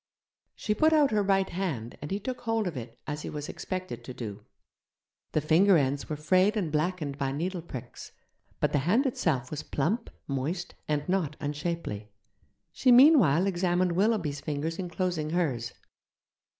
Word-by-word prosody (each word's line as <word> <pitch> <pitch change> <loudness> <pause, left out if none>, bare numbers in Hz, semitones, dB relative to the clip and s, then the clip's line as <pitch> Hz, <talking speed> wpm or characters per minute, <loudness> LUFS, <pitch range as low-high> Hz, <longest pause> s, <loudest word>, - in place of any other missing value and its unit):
She 210 - -1
put 315 +8 +3
out 295 -4 +4
her 210 -1 +2
right 195 -1 +2
hand, 155 - -3
and 150 - -5
he 200 - -1
took 250 +4 -5
hold 225 -2 0
of 175 -4 -3
it, 115 -1 -7
as 150 -1 -4
he - - -5
was 150 -1 -5
expected 185 -1 -5
to 130 - -8
do. 105 -4 -6 0.9
The 155 - +2
finger 175 +5 +5
ends 140 -1 0
were 155 - -1
frayed 185 +8 +3
and 175 -7 -1
blackened 155 -2 -1
by 135 -1 0
needle 175 +5 -2
pricks, 130 -7 -9 0.5
but - - +1
the 145 - +2
hand 195 - +2
itself 145 - 0
was 150 -1 -3
plump, 200 - -1 0.2
moist, 145 +6 -3
and 150 -1 -1
not 180 -5 0
unshapely. 145 -8 -4 0.6
She 255 - +3
meanwhile 245 - +7
examined 180 -1 +1
Willoughby's 175 -7 +1
fingers 155 +3 -3
enclosing 180 -3 -2
hers. 145 -9 -1
170 Hz, 165 wpm, -28 LUFS, 145-195 Hz, 0.9 s, meanwhile